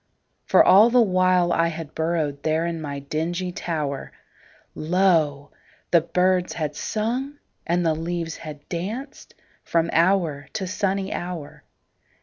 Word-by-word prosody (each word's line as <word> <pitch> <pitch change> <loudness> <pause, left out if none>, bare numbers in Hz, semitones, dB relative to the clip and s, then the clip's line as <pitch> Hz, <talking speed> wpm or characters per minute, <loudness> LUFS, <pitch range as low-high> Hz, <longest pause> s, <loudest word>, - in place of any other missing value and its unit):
For - - +6
all 210 +5 +7
the 250 +1 +4
while 185 -4 +3
I 165 0 +2
had 165 -2 -6
burrowedThere 160 0 -1
in 165 -1 -4
my 145 -2 -5
dingy 165 +6 -3
tower, 150 -6 -4 0.6
Lo! 160 -5 +1 0.4
the 170 - +6
birds 180 +2 +1
had 150 -3 -3
sung 245 - -2 0.3
and 175 +1 +1
the 160 - +3
leaves 165 0 -4
had 150 -3 -10
dancedFrom 185 - -4
hour 165 -5 +2
to 195 - -3
sunny 195 0 -1
hour. 175 -4 -6
170 Hz, 125 wpm, -23 LUFS, 155-185 Hz, 0.6 s, all